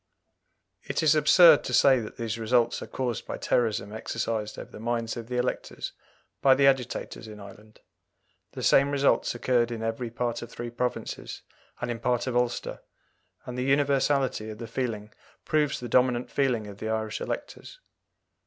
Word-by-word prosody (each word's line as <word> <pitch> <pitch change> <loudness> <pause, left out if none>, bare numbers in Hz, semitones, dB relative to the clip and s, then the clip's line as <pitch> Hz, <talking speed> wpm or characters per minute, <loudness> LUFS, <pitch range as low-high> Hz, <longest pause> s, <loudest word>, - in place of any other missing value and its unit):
It - - -2
is 155 -1 +5
absurd 155 +1 +7
to - - 0
say 135 -2 +6
that 110 -2 -8
these 115 -1 -3
results 120 +1 +1
are - - -7
caused 125 -3 -3
by - - -4
terrorism 110 -3 0
exercised 110 -1 -3
over - - -9
the - - -10
minds 115 0 -2
of 115 -2 -7
the 125 0 -3
electors 125 +1 -3 0.5
by 135 -1 +6
the 140 +1 +3
agitators 130 -4 0
in 105 -1 -10
Ireland; 105 +2 -14 0.7
the - - -6
same 140 +1 +5
results 140 -3 +2
occurred 120 -1 +1
in 115 -2 -5
every 115 +2 -3
part 120 0 -3
of 120 - -8
three 120 -1 -6
provinces, 125 +1 -4 0.4
and 120 - -2
in 115 - -4
part 125 0 0
of 130 -2 -3
Ulster, 125 0 -1 0.6
and 125 - -6
the - - 0
universality 135 -4 +1
of 110 - -7
the 115 - -6
feeling 115 -3 -4 0.3
proves 150 -2 +1
the 125 - -6
dominant 125 0 +2
feeling 125 -6 +1
of 100 -1 -10
the 110 - -4
Irish 110 -1 -2
electors. - - -6
120 Hz, 170 wpm, -27 LUFS, 110-130 Hz, 0.7 s, absurd